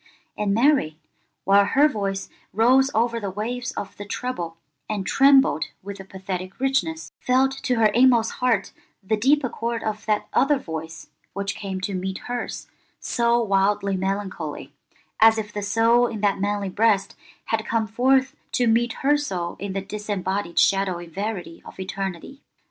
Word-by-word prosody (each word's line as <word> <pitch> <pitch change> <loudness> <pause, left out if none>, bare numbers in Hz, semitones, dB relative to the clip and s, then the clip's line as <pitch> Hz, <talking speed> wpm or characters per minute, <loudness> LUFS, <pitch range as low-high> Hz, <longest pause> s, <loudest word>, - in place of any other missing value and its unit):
And 210 -1 -1
Mary, 230 - +2 0.5
while 200 +1 +5
her 275 +9 +4
voice 200 -7 -3 0.3
rose 255 +5 +4
over 230 +1 +1
the 200 -3 -4
waves 240 +6 -4
of 200 - -6
the 205 - -6
treble, 175 -9 -4 0.3
and 205 -3 -2
trembled 270 - +4 0.2
with 200 0 -7
a - - -7
pathetic 190 -1 -6
richness, 270 +5 -1
felt 260 +1 +2
to 250 - 0
her 225 -1 +3
inmost 235 +1 +4
heart 230 -6 +1 0.3
the 220 +3 +1
deep 275 +7 +3
accord 235 -1 -3
of 215 0 -4
that 210 -1 +1
other 285 +1 +3
voice 160 -7 -7 0.2
which 200 +1 -3
came 195 -2 -5
to 195 +2 -3
meet 190 +1 -3
hers 245 0 -4 0.3
so 235 0 +1
wildly 200 -1 +1
melancholy, 190 -5 -4 0.5
as 225 0 +6
if 210 -1 -4
the 205 - -3
soul 230 +4 +3
in 220 -3 -6
that 200 -2 +1
manly 205 -1 -1
breast 205 0 +1 0.3
had 225 -1 -1
come 225 0 0
forth 265 +5 +2 0.2
to 245 - +2
meet 235 +1 +2
her 290 +1 +5
soul 180 -12 -3
in 200 0 -4
the 195 - -2
disembodied 200 -3 -3
shadowy 190 -3 +2
verity 185 0 -5
of - - -13
eternity. 195 - -5
210 Hz, 160 wpm, -23 LUFS, 195-240 Hz, 0.5 s, as